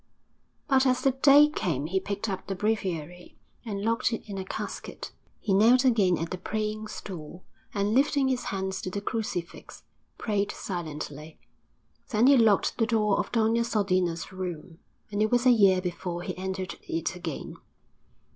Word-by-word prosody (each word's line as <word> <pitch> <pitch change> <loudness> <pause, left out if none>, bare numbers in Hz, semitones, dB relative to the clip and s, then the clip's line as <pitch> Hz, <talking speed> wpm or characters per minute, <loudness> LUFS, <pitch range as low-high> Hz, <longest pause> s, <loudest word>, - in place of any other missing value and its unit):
But 270 -2 +4
as 255 0 +1
the 270 - +4
day 280 +3 +6
came 165 - -2
he 190 +4 0
picked 200 +3 -4
up 190 -3 -4
the 195 - -2
breviary 180 -5 -3 0.3
and 205 -4 -4
locked 230 +1 +1
it 230 - -5
in 200 -2 -5
a - - -3
casket; 185 - -6 0.3
he 200 - -1
knelt 240 +6 +5
again 200 -8 +4
at 165 +1 -4
the 185 - -4
praying 215 +2 -3
stool 175 -4 -8 0.3
and, 205 -3 0
lifting 275 +1 +3
his 255 -2 -1
hands 190 -1 -3
to - - -4
the 200 - -3
crucifix, 200 -5 -5 0.3
prayed 205 -2 -1
silently. 155 -3 -6 0.7
Then 230 -2 +3
he 275 +1 +7
locked 225 -3 +3
the 225 - +3
door 210 -3 +2
of - - -2
Doña 230 0 +2
Sodina's 185 -7 0
room, 175 -3 -6 0.3
and 205 0 -1
it 215 - +3
was 245 +2 +2
a 255 - +7
year 195 -5 +5
before 175 -1 -4
he - - -4
entered 190 0 -4
it 165 +2 -2
again. 170 -5 -6
200 Hz, 165 wpm, -27 LUFS, 180-230 Hz, 0.7 s, he